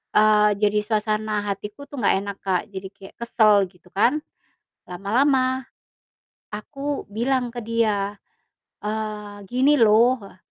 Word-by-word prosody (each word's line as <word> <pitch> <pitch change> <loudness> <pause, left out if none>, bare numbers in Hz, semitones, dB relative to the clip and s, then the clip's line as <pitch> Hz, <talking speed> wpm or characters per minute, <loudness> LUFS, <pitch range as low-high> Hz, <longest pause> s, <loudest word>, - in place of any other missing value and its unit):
eee, 210 0 +5
jadi 210 0 +3
suasana 215 -1 -1
hatiku 205 +6 -6
tuh 285 - -9
enggak 210 - +3
enak, 200 -1 -6
Kak, 185 -2 +1
jadi 190 -1 -6
kayak 195 -1 -14
kesel 215 -4 +4
gitu 180 -1 -24
kan. 245 +10 +2 0.7
Lama-lama 255 +7 +1 0.9
aku 275 +7 -4
bilang 245 +4 0
ke 245 - -4
dia, 210 -3 0 0.7
eee, 210 -1 -4
"Gini 265 +4 +3
loh" 230 0 +5
Heeh, 195 -2 -13
215 Hz, 125 wpm, -23 LUFS, 205-245 Hz, 0.9 s, eee